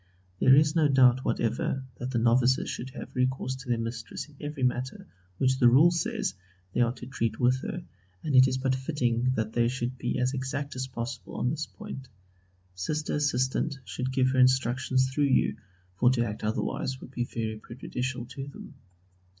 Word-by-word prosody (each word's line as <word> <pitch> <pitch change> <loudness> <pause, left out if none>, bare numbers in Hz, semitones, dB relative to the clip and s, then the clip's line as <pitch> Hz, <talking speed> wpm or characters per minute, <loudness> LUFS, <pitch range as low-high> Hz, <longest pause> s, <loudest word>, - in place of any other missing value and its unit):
There 130 - +7
is 150 +2 +4
no 160 -3 +4
doubt 130 -2 +5
whatever 120 +3 -1 0.2
that 125 - -3
the 130 - -1
novices 120 +2 +3
should 125 - -5
have 135 - -9
recourse 130 0 0
to 130 -1 -10
their 120 - +2
Mistress 115 +2 -5
in 150 - -19
every 145 -2 -4
matter, 125 +1 -1 0.3
which 130 +2 +2
the 120 - +6
Rule 145 +8 +6
says 165 - -1 0.4
they - - +2
are 120 -1 +3
to 125 - -10
treat 115 -4 -2
with 125 +1 +3
her, 175 +3 -5 0.4
and 145 -3 0
it 130 0 +8
is 130 0 -1
but 130 0 +1
fitting 130 -3 0
that 110 -1 -2
they 120 -1 +3
should 125 0 -3
be 120 - -1
as 125 +1 +1
exact 135 +2 -3
as 130 0 -3
possible 120 -1 -6
on 125 - 0
this 155 +1 -3
point. 205 -12 -9 0.7
Sister 150 +12 -2
Assistant 140 0 0
should 125 +7 -3
give 130 -1 +2
her 130 - +1
instructions 130 0 +3
through 145 +2 +2
you: 135 - +2 0.4
for 125 +4 +5
to 120 -2 +2
act 105 -1 -5
otherwise 130 +4 -2
would - - -11
be 120 -2 -2
very 110 -2 -4
prejudicial 125 +2 -5
to 135 +3 -7
them. 140 - -10
130 Hz, 190 wpm, -28 LUFS, 120-135 Hz, 0.7 s, it